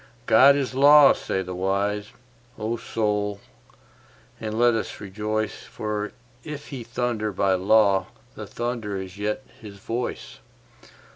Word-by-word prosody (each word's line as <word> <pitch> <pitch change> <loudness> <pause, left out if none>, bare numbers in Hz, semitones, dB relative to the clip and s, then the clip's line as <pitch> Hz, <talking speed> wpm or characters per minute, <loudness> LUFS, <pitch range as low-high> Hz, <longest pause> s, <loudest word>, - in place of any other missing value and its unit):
God 135 +5 +7
is 135 -2 -2
law, 145 +1 +7
say 95 - -3
the 90 0 -6
wise; 100 +3 -1 0.5
O 110 +2 -2
Soul, 105 -3 -2 1.0
and 110 -1 -4
let 120 0 +4
us 115 - -3
rejoice, 105 +2 -3
For 105 -1 -4 0.3
if 150 -1 -8
He 130 -4 -6
thunder 115 -2 -2
by 95 0 +1
law 100 0 +3 0.3
the - - -8
thunder 120 -4 -3
is 95 +1 -9
yet 105 +5 -2 0.2
His 105 -3 -11
voice. 115 +5 -5
110 Hz, 130 wpm, -24 LUFS, 100-120 Hz, 1.0 s, God